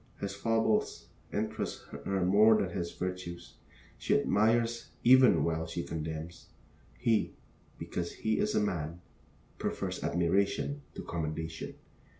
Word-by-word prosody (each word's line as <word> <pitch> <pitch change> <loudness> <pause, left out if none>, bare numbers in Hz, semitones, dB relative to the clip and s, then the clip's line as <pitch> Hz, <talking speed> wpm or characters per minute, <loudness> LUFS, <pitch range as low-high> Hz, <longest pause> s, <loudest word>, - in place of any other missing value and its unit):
His 100 0 -3
foibles 110 +1 0 0.2
interest - - -3 0.2
her 95 -2 +1
more 110 +4 +6
than 95 - -1
his 85 -3 -3
virtues. 90 -1 -5 0.5
She - - +3
admires 115 +2 +2
even 130 +1 +7
while 80 -1 -1
she 85 +1 -3
condemns. 80 +1 -5 0.5
He, 115 -2 +1 0.4
because 85 -1 -4
he 110 0 -1
is 105 - +1
a - - +4
man, 85 -5 -2 0.6
prefers - - -3
admiration 100 - +1
to - - -6
commendation. 80 -1 -4
95 Hz, 120 wpm, -31 LUFS, 85-110 Hz, 0.6 s, even